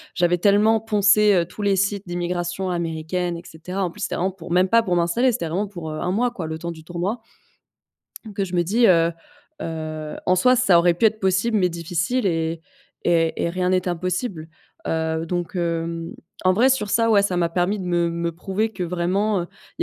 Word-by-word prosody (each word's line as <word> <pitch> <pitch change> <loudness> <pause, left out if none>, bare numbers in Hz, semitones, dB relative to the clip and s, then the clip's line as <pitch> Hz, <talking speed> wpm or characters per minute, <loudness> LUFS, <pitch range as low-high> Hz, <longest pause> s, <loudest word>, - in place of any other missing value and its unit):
j'avais 175 0 +2
tellement 210 +4 +4
poncé, 210 -1 +4
heu, 175 -2 +2
tous 180 +5 -10
les 200 -1 +2
sites 200 0 -1
d'immigration 175 +1 -2
américaines 170 +1 -2
et 170 - -10
cetera, 180 +5 -5
en 175 - -3
plus - - -12
c'était - - -2
vraiment 185 +2 0
pour 175 -3 -11
même 180 +2 +4
pas 230 +3 +5
pour 180 -5 -1
m'installer, 175 +10 +2
c'était 235 -6 -3
vraiment 195 +6 -1
pour, 175 -5 -7
heu, 155 - -5
1 180 - -1
mois 240 +5 +1
quoi, 185 -9 -5
le 160 0 -4
temps 170 +1 -5
du 160 -1 -11
tournoi 175 +7 -3 1.2
que 195 - 0
je 180 -1 -5
me 175 - +3
dis, 225 +7 +3
heu 170 -2 +4 0.5
heu, 155 -1 -5
en 185 - +3
soi 250 +8 +4
ça 215 -8 +4
aurait 175 0 +4
pu 200 - +2
être 220 0 +2
possible 195 +4 +1
mais 180 -3 +2
difficile 170 +8 -2
et 165 -2 -1 0.4
et 165 -2 +1
et - - +1
rien 180 +1 -1
n'est 185 0 +1
impossible, 180 0 -3 0.4
heu, 160 0 -1
donc 175 +1 -3
hem, 165 -1 -2 0.3
en 185 - +5
vrai, 240 +7 +4
sur 235 -6 0
ça 230 +2 +2
ouais, 205 -2 +5
ça 200 -2 0
m'a 170 -1 +1
permis 180 +4 0
de - - -5
me 175 -1 +1
me 170 0 -2
prouver 195 +6 -2
que, 190 - -4
vraiment, 180 +4 0
heu, 170 - -6 0.3
il - - -5
180 Hz, 215 wpm, -22 LUFS, 170-200 Hz, 1.2 s, pas